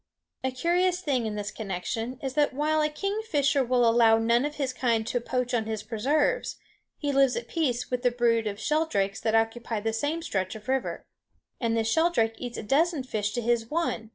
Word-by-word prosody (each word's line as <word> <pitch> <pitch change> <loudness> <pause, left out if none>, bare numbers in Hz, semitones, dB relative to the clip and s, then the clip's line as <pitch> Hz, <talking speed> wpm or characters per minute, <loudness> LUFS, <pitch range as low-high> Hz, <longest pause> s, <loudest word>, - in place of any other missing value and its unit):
A 260 - +1
curious 350 +7 +1
thing, 270 -10 0
in 210 - -4
this 205 0 -4
connection, 220 +4 -4
is 265 -1 -2
that 295 -2 +1
while 310 +2 +1
a 300 - +2
kingfisher 305 -6 0
will 245 -1 +3
allow 230 -1 +5
none 235 +3 +2
of 295 0 -4
his 270 -3 -2
kind 230 -3 +1
to 245 +1 -1
poach 250 +1 -2
on 225 -2 +1
his 220 -1 -3
preserves, 280 - 0 0.4
he 290 -1 -1
lives 270 -3 +3
at 235 0 -4
peace 255 -9 -1
with 250 -1 -1
the 250 - +3
brood 235 -2 +1
of 205 0 -4
sheldrakes 220 -9 0
that 225 -1 0
occupy 225 0 0
the 225 +1 -2
same 295 +8 -1
stretch 190 - -2
of 220 +2 -11
river. 265 -1 -2 0.5
And 230 -2 0
the 225 - +2
sheldrake 225 -2 +2
eats 245 -1 -5
a - - -5
dozen 300 +5 +2
fish 210 -5 -2
to 240 - -2
his 230 -1 +1
one. 305 -9 -2
245 Hz, 205 wpm, -27 LUFS, 225-290 Hz, 0.5 s, allow